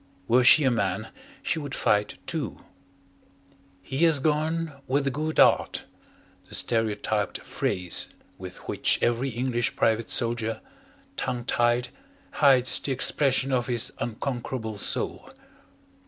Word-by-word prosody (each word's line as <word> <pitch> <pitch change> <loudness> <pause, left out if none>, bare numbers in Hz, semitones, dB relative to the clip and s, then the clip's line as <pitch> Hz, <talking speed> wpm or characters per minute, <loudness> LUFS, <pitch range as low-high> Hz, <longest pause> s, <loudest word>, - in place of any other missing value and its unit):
Were 125 +2 +4
she 150 +4 +7
a 130 - +3
man 100 -2 -1 0.3
she 165 - -1
would 145 -3 -5
fight 105 0 +1
too. - - -4 1.2
He 130 +8 -5
has 160 -3 +4
gone 155 0 -1
"with 140 +2 +1
a 135 - +1
good 155 +4 -2
'eart" - - +4 0.7
the - - -6
stereotyped 110 -3 -1
phrase 90 -2 -2 0.3
with 90 -1 -10
which - - +1
every 120 +3 +1
English 120 0 -1
private 110 0 +1
soldier, 115 -1 +1 0.6
tongue 120 -1 -3
tied, 120 +1 +1 0.4
hides 130 -3 +5
the 140 - -3
expression 135 0 +2
of 125 -2 0
his 120 -1 +1
unconquerable 120 -2 -4
soul. - - -2
125 Hz, 125 wpm, -26 LUFS, 115-135 Hz, 1.2 s, she